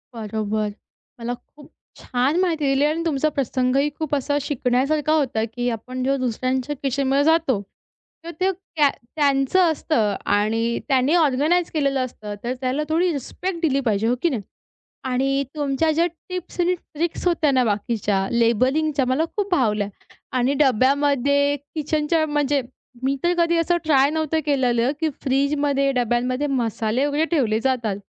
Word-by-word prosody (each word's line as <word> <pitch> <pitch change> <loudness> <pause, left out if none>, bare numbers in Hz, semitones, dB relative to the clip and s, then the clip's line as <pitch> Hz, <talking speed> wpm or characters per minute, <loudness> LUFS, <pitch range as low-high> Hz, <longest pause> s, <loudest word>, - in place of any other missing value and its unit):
बरोबर. 215 -1 -2 0.5
मला 235 +1 -3
खूप 290 +4 -15 0.3
छान 260 +7 0
माहिती 330 -5 +1
दिली 275 +1 +2
आणि 310 +2 0
तुमचा 310 -1 +1
प्रसंगही 270 0 0
खूप 310 -2 -3
असा 285 +1 0
शिकण्यासारखा 280 +3 0
होता, 265 -8 +1
की 245 +1 -1
आपण 250 +3 -4
जेव्हा 275 +1 +1
दुसऱ्यांच्या 255 +3 -1
किचनमध्ये 275 +1 +1
जातो, 310 -9 +2 0.6
तेव्हा 335 - -5
ते 375 +1 +2 0.2
त्या 295 -3 +5 0.3
त्यांचं 280 +3 +2
असतं 225 -10 0 0.2
आणि 225 +3 0
त्यांनी 270 +2 +2
ऑर्गनाइज 320 +3 +2
केलेलं 275 -3 +1
असतं. 210 -4 -8
तर 240 +1 -1
त्याला 260 +4 0
थोडी 345 +3 +2
रिस्पेक्ट 340 +6 -4
दिली 275 -4 +2
पाहिजे. 215 +1 +1
हो 245 - +2
की 340 - +3
नाही. 250 -8 -2 0.6
आणि 270 +2 +1
तुमच्या 295 +2 +1
ज्या 330 +2 +2
टिप्स 360 +2 -9
आणि 360 +1 +2
ट्रिक्स 340 +1 -4
होत्या 320 -4 +2
ना, 260 -2 +3
बाकीच्या 205 -3 0
लेबलिंगच्या, 255 +5 +2
मला 260 +5 +1
खूप 405 -1 -1
भावल्या 210 - +1 0.5
आणि 255 +3 +2
डब्यामध्ये, 280 +2 +3 0.2
किचनच्या 310 +1 0
म्हणजे 290 -2 +1 0.4
मी 270 +1 +1
तर 345 - +3
कधी 340 0 +2
असं 340 +1 +2
ट्राय 280 -3 +4
नव्हतं 315 0 0
केलेलं, 255 -4 +2
की 320 -1 +1
फ्रिजमध्ये 280 +1 +1
डब्यांमध्ये 250 +2 0
मसाले 235 -1 0
वगैरे 290 +2 +1
ठेवले 220 -6 +1
जातात. 235 -5 0
275 Hz, 145 wpm, -22 LUFS, 245-305 Hz, 0.6 s, त्या